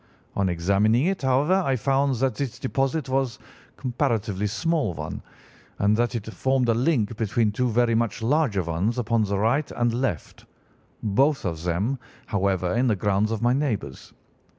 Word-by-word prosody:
On 100 -1 +1
examining 100 - +2
it, 195 +1 0
however, 135 +6 +2
I 135 -5 +1
found 135 +2 +1
that 130 +1 0
this 130 +1 -4
deposit 135 +2 -1
was 130 -1 0
a - - -24
comparatively 115 -6 -1
small 135 - -1
one, - - -5 0.6
and 100 +2 +3
that 120 +2 0
it 110 -3 -3
formed 130 -2 +1
a - - +5
link 120 -3 +1
between 110 -1 +1
two 125 +4 0
very 120 +1 +2
much 115 -1 0
larger 125 - +2
ones 85 +9 -1
upon 115 -2 +1
the 100 0 -1
right 120 +9 +1
and 120 -1 0
left—both 125 - -2
of 80 -3 -3
them, 100 +10 0 0.3
however, 95 -3 0
in 125 +3 +2
the 110 - +2
grounds 100 +2 +1
of 115 0 -3
my 120 +1 +4
neighbours. 110 - -3
115 Hz, 165 wpm, -25 LUFS, 100-135 Hz, 0.6 s, a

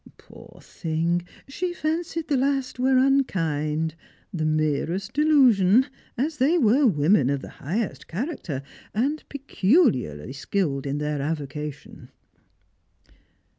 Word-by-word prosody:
Poor - - -15
thing, 170 +1 -2 0.2
she 350 +6 -3
fancied 325 +1 -2
the 290 - +1
last 270 -1 0
were 260 +1 +3
unkind; 160 - +1 0.4
the 155 -3 -1
merest 155 +7 -1
delusion, 260 -8 +5 0.3
as 300 +5 -1
they 290 +6 +3
were 260 0 +4
women 150 - +3
of 140 -1 -1
the - - -8
highest 195 - -3
character, 180 - -4 0.3
and 280 +8 0
peculiarly 210 - +1
skilled 140 -2 -2
in 140 +1 -2
their 150 -1 -2
avocation." 150 -1 -5
195 Hz, 110 wpm, -24 LUFS, -, 0.4 s, delusion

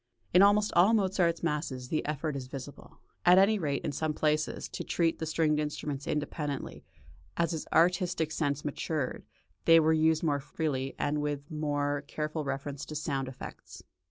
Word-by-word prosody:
In 180 - +7
almost 205 +1 +4
all 195 +6 +5
Mozart's 185 -5 +1
masses 145 -6 -2
the 155 - 0
effort 150 0 -2
is 130 -2 -5
visible, 135 +1 -10 0.2
at 180 +1 +7
any 200 +2 +5
rate 145 -5 -2
in - - -1
some 155 +1 -2
places, 150 0 0
to - - -5
treat 165 -1 0
the 160 - -3
stringed 155 -1 +1
instruments 150 -2 -4
independently; 150 -1 -3 0.5
as 165 -2 +1
his 160 -2 -4
artistic 170 -1 +2
sense 145 -2 -1
matured, 145 -1 -3 0.4
they 165 0 +8
were 160 0 +4
used 160 0 +3
more 145 -3 +1
freely, 135 -2 -3
and 150 +1 0
with 145 0 -3
more 145 -2 -1
careful 155 +1 -3
reference 140 0 -4
to 155 - -8
sound 140 -3 -2
effects. 130 - -10
150 Hz, 165 wpm, -30 LUFS, 145-165 Hz, 0.5 s, they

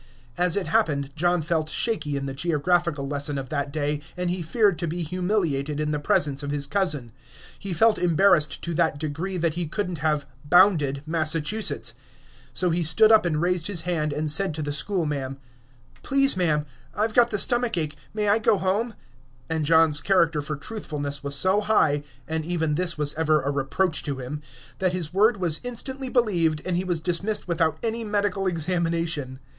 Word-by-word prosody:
As 180 +1 +1
it 195 - -1
happened, 145 -11 0
John 175 +1 +1
felt 155 -1 -1
shaky 155 -12 -1
in 140 - -4
the 135 - -4
geographical 170 0 0
lesson 145 0 -1
of 135 -1 -5
that 140 -2 -2
day, 150 0 -2 0.2
and 180 -1 -1
he 180 0 -3
feared 195 0 +1
to 170 - -2
be 170 +2 -3
humiliated 160 -5 -1
in 150 0 -1
the 150 - -1
presence 145 -1 +1
of 145 - -5
his 145 -1 -1
cousin; 145 - 0 0.5
he 200 - -6
felt 220 +6 +3
embarrassed 170 -3 +3
to 170 - -3
that 160 -2 +1
degree 160 +5 -4
that 165 -2 0
he 170 0 -3
could 190 +3 -3
n't 170 - -4
have 150 -2 0 0.2
"bounded" 150 -4 +3
Massachusetts. 160 - 0 0.6
So 175 +9 +2
he 170 +2 0
stood 215 +7 +5
up 215 -5 +5
and 155 -3 -1
raised 175 0 0
his 190 -5 0
hand, 160 -3 -1
and 150 +1 -1
said 185 0 +3
to 155 - -3
the 145 - -3
schoolma'am, 145 -4 -2 0.6
"Please, 275 0 +3
ma'am, 155 -5 +1 0.3
I 210 - +1
've 220 - -12
got 240 0 +5
the 210 - -1
stomach 240 0 +2
ache; 155 -3 -2 0.2
may 210 -1 -1
I 205 +2 +4
go 210 -1 +3
home?" 205 +5 -1 0.6
And 160 -2 0
John's 160 -2 +4
character 165 -4 +2
for 150 +1 -4
truthfulness 145 -5 -5
was 140 0 -2
so 185 +8 +3
high 155 -9 +2 0.3
(and 160 0 -2
even 160 -2 -1
this 170 +1 -1
was 150 -1 -1
ever 155 -2 +1
a 140 - -1
reproach 145 +5 0
to 140 -3 -3
him), 135 +4 -6 0.4
that 185 -1 +1
his 175 -3 -3
word 215 +3 +3
was 170 -4 +2
instantly 260 +2 -4
believed, 175 -11 +1
and 185 - -1
he 180 - 0
was 175 -3 -1
dismissed 190 +6 0
without 165 -2 0
any 230 0 -1
medical 205 -2 -1
examination. 165 -5 -1
165 Hz, 190 wpm, -24 LUFS, 150-190 Hz, 0.6 s, stood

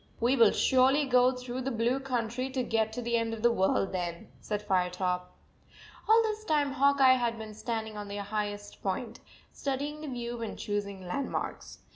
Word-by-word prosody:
"We 240 +3 +3
will 230 -5 +7
surely 265 +5 +3
go 250 -1 +4
through 250 0 -5
the 265 - -2
blue 240 +2 +1
99 - - -12
country 250 0 -2
to 260 -1 -1
get 220 -2 0
to 245 - -4
the 235 0 +1
end 225 0 -1
of 220 - -10
the 240 - +6
world 190 -2 +1
then," 175 -2 -4
said 210 -1 -3
Firetop.. 180 -1 0 0.8
All 455 +1 +7
this 430 -1 -2
time 295 -6 +1
Hawk 280 +1 +3
Eye 260 -1 +7
had 235 -2 -1
been 220 -1 -7
stand 220 0 -3
ing 215 - -10
on 205 -1 -6
the 200 0 -5
highest 205 0 -4
point, 220 +4 -3 0.3
studying 285 +2 -3
the 310 - -6
view 240 -2 -4
and 225 - -5
choosing 200 -2 -4
landmarks. 260 +10 -4
235 Hz, 195 wpm, -30 LUFS, 205-260 Hz, 0.8 s, will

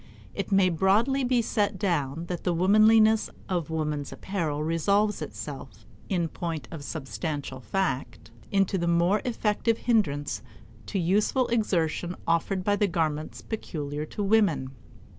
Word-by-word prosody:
It - - -4
may 195 -1 +5
broadly 210 - +2
be 245 -1 +2
set 205 -3 0
down 165 -5 -1
that 175 -1 -5
the 175 -2 +1
womanliness 215 +4 +5 0.2
of 175 -5 -2
woman's 150 -3 -2
apparel 160 -6 -3
resolves 200 +6 +1
itself, - - -7 0.2
in 175 -4 +1
point 160 -4 -5
of 160 -4 -7
substantial 145 -2 -4
fact, 135 - -2 0.2
into 195 -1 +2
the 170 - -1
more 170 +4 +3
effective 225 -1 0
hindrance 145 - 0 0.5
to 200 - -2
useful 205 +8 +2
exertion 180 -6 0
offered 170 +3 0
by 205 +1 +2
the 205 - +2
garments 155 -4 -2
peculiar 150 -8 -4
to 205 - -4
women. 195 -11 +2
180 Hz, 135 wpm, -27 LUFS, 155-210 Hz, 0.5 s, may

